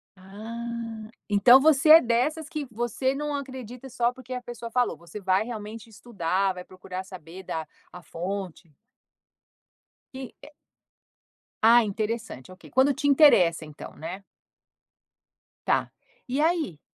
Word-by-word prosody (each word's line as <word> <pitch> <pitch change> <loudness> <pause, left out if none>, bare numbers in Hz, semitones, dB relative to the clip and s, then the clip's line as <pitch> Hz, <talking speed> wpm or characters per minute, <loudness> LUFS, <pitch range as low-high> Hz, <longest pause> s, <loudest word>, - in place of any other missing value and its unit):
Ah, 225 +3 -7 0.2
então 215 +5 +7
você 305 +1 +4
é 320 +1 +11
dessas 285 +7 0
que 305 -5 -5
você 240 +4 -1
não 295 0 -3
acredita 260 -2 -8
só 240 0 0
porque 255 0 -9
a 250 - -4
pessoa 240 -1 -8
falou, 245 +1 0
você 170 +5 -10
vai 190 +1 +1
realmente 220 -1 -8
estudar, 195 -4 -1
vai 180 0 -8
procurar 185 0 -8
saber 185 -1 -11
da 160 -3 -5 0.2
a 180 - -11
fonte. 180 -3 -6 1.4
E 265 - -6 0.2
é 295 - -13 1.1
Ah, 235 +2 +7
interessante, 215 - -4
ok. 185 - -14
Quando 265 +2 +4
te 285 - -2
interessa, 185 - +5
então, 150 -1 -11
né? 180 +5 -7 1.4
Tá, - - +1 0.4
e 260 +3 -2
aí? 315 - 0
230 Hz, 130 wpm, -26 LUFS, 190-260 Hz, 1.4 s, é